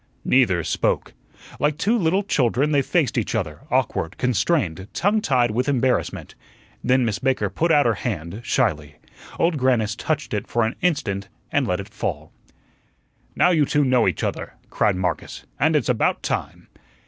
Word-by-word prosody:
Neither 95 -10 +3
spoke. - - -1 0.5
Like 150 0 +1
two 215 +8 +1
little 190 -1 +1
children 140 - +1
they 145 -2 +3
faced 140 -3 +1
each 115 - -3
other, 85 -9 -3
awkward, 80 - -1
constrained, 115 - 0
tongue 205 +4 +2
tied 125 - +2
with 125 +6 0
embarrassment. 130 -2 0 0.5
Then 130 -1 +3
Miss 105 -3 -1
Baker 130 -7 0
put 165 - 0
out 145 -2 +5
her 115 - +3
hand 100 -2 -4
shyly. 75 - 0 0.4
Old 165 -2 +1
Grannis 115 -5 +1
touched 155 +1 -3
it 105 -1 -2
for 115 - +1
an 110 - -3
instant 125 - -1 0.2
and - - +1
let 90 +1 0
it 100 - -6
fall. - - -5 1.0
"Now 180 - +4
you 155 -5 +3 0.2
know 125 -4 +3
each 90 - -1
other," - - -3 0.2
cried 105 -3 +2
Marcus, 90 -3 -3
"and 155 +3 +3
it's 145 - +1
about 120 -3 +1
time." - - -4
125 Hz, 160 wpm, -22 LUFS, 100-150 Hz, 1.0 s, out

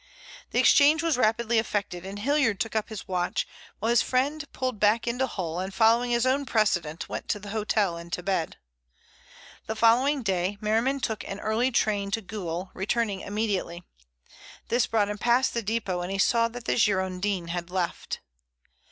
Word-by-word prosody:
The - - -3
exchange 305 +2 +5
was 330 -3 +2
rapidly 235 -1 +2
effected, 200 -5 -3
and 195 +1 -6
Hilliard 255 -2 +1
took 225 +2 -3
up 220 0 -1
his 220 -3 -7
watch, 180 -1 -1 0.3
while 225 +3 0
his 240 - +5
friend 280 +4 0
pulled 255 -5 -3
back 215 +3 +3
into 245 +3 0
Hull, 175 -6 -4
and 190 +1 -3
following 230 +4 +3
his 240 +1 +2
own 265 +2 +2
precedent, 175 -9 0
went - - -5
to - - 0
the 205 0 -8
hotel 210 -4 0
and 170 0 -10
to 180 - -2
bed. 185 -4 -1 1.1
The 220 - -2
following 250 +5 +3
day 190 0 0
Merriman 230 +6 +1
took 220 -3 -2
an 195 - -6
early 220 +5 +1
train 205 -5 0
to - - -7
Goole, 185 -3 -5
returning 200 +1 -1
immediately. 200 -5 -2 0.9
This 240 0 +2
brought 215 -2 +2
him 210 0 -4
past 245 +2 +2
the 235 - -1
depot, 205 -4 -2
and 175 +2 -4
he 195 - -2
saw 230 +3 +3
that 235 0 -9
the - - 0
Girondin 190 -3 0
had 175 0 -4
left. 180 -2 -3
215 Hz, 180 wpm, -27 LUFS, 190-235 Hz, 1.1 s, exchange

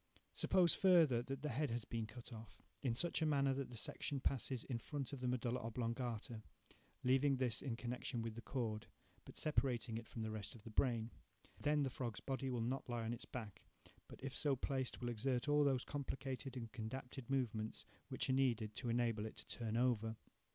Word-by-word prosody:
Suppose, 180 -2 +5
further, 165 -10 +6
that 135 +2 -4
the 150 - 0
head 145 +3 +1
has 115 -1 -2
been 115 -2 -2
cut 120 +2 -8
off, 110 0 -10 0.2
in 125 -5 +1
such 170 +5 +2
a - - +4
manner, 140 -2 +4
that 135 0 -2
the 120 - -7
section 140 +5 -1
passes 130 -2 0
in 120 -3 -2
front 140 +1 -3
of 140 - -4
the 125 - -1
medulla 125 0 +1
oblongata, 115 -1 -2 0.6
leaving 135 +2 +4
this 125 -3 +2
in 130 -5 -1
connection 120 0 -3
with 115 -1 -3
the 115 - -7
cord, 115 -5 -2 0.4
but - - -11
separating 125 -6 +1
it 115 - -11
from 115 - -4
the 110 - -2
rest 105 0 -4
of 110 - -13
the 115 - -8
brain. 115 -1 +2 0.5
Then 150 0 +3
the 135 - 0
frog's 120 -6 -3
body 135 0 -2
will 125 -2 0
not 125 +3 -1
lie 120 -1 -1
on 115 +1 -1
its 120 - -6
back, 110 -6 -6 0.5
but - - -11
if 135 -1 -3
so 145 -3 +3
placed 130 -1 -1
will 120 - 0
exert 125 +3 0
all 145 0 +5
those 135 -3 +3
complicated 135 -2 -3
and 115 -3 -5
condapted 125 +2 -5
movements 115 -5 0 0.2
which - - -1
are 130 - +3
needed 120 -5 +2
to 120 - -2
enable 115 -2 +2
it - - -8
to - - -6
turn 115 -1 -1
over. 115 -3 +2
125 Hz, 205 wpm, -41 LUFS, 115-135 Hz, 0.6 s, further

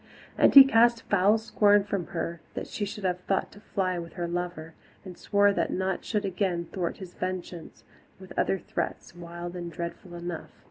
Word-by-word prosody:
And - - +4
he 275 - +14
cast 235 -2 +4
foul 200 +2 +4
scorn 205 -2 +3
at 200 - -19 0.2
her 170 -2 -4
that - - -4
she 205 - -4
should 205 0 -7
have 180 -1 0
thought 195 - 0
to 205 - -14
fly 185 -4 -2
with 170 0 -8
her 175 -1 -3
lover, 175 -2 -4 0.3
and 185 -2 -8
swore 205 +1 +3
that - - 0
naught 190 0 -2
should 210 -2 -1
again 180 -2 -1
thwart 175 -3 -2
his 185 -2 -10
vengeance, 180 -2 -6 0.4
with 190 -1 -11
other 195 - +1
threats, 175 - -5
wild 175 0 -7
and 175 -1 -5
dreadful 170 +2 -7
enough. 170 -1 -6
185 Hz, 185 wpm, -27 LUFS, 175-205 Hz, 0.4 s, he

